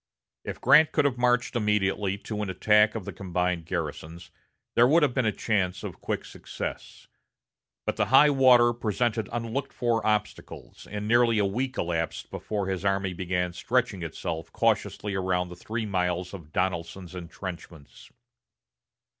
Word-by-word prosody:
If - - -6
Grant 155 0 +6
could - - +2
have 130 -3 0
marched 125 +1 +2
immediately 105 -3 +1
to 105 +1 -5
an 105 - -3
attack 105 +4 +3
of 110 -5 -5
the - - -6
combined 90 -2 -2
garrisons, 85 0 -5 0.4
there 120 +1 +5
would 155 +4 +4
have 140 -4 +2
been 125 -4 +1
a - - +3
chance 100 -5 -1
of - - -7
quick - - -3
success. - - -7 0.8
But - - -2
the - - +1
high 145 +4 +6
water 125 -3 +6
presented 115 0 -1
unlooked 120 +3 -3
for 120 -2 0
obstacles, 105 -1 -3
and 105 0 -4
nearly 120 0 +4
a 105 - +3
week 125 +7 -2
elapsed 85 -1 -2
before 105 -2 -3
his 95 -1 -3
army 95 -1 0
began 90 0 -2
stretching 115 +1 0
itself 80 0 -5
cautiously 105 -2 0
around 90 -2 0
the 90 - -9
three 110 +5 -4
miles 90 -2 -1
of 85 -6 -10
Donelson's 90 0 -2
intrenchments. 85 -3 -9
100 Hz, 155 wpm, -27 LUFS, 90-120 Hz, 0.8 s, Grant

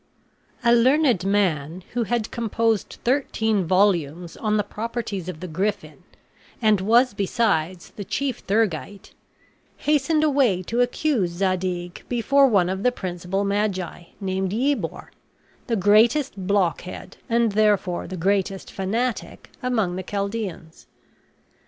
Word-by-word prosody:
A 235 0 +5
learned 250 - +3
man 180 -4 0
who 240 -1 0
had 235 -1 -1
composed 225 -2 -1
thirteen 220 -6 +1
volumes 175 -3 +1
on 215 -1 0
the 210 - +1
properties 210 -3 -4
of 155 -4 -7
the 185 - -5
griffin, 190 +6 -3 0.6
and 215 -4 +3
was 235 +5 +4
besides 190 -4 -1
the 205 - -7
chief 265 +6 -2
theurgite, 200 -2 -1 0.7
hastened 300 +1 +1
away 265 -11 +2
to 235 +7 0
accuse 245 - +1
Zadig 180 -1 -2
before 275 +4 +4
one 195 -8 +3
of 190 +1 -2
the 250 - +3
principal 185 -2 -3
magi, 200 -4 -2
named 190 -1 -2
Yebor, 270 +5 -1 0.6
the 235 - +1
greatest 215 +1 +3
blockhead 185 -1 -1
and 230 -1 +2
therefore 205 -4 +1
the 185 - -6
greatest 195 +2 -1
fanatic 225 +6 -3
among 220 -8 0
the - - -2
Chaldeans. 200 -5 -5
205 Hz, 120 wpm, -23 LUFS, 185-235 Hz, 0.7 s, A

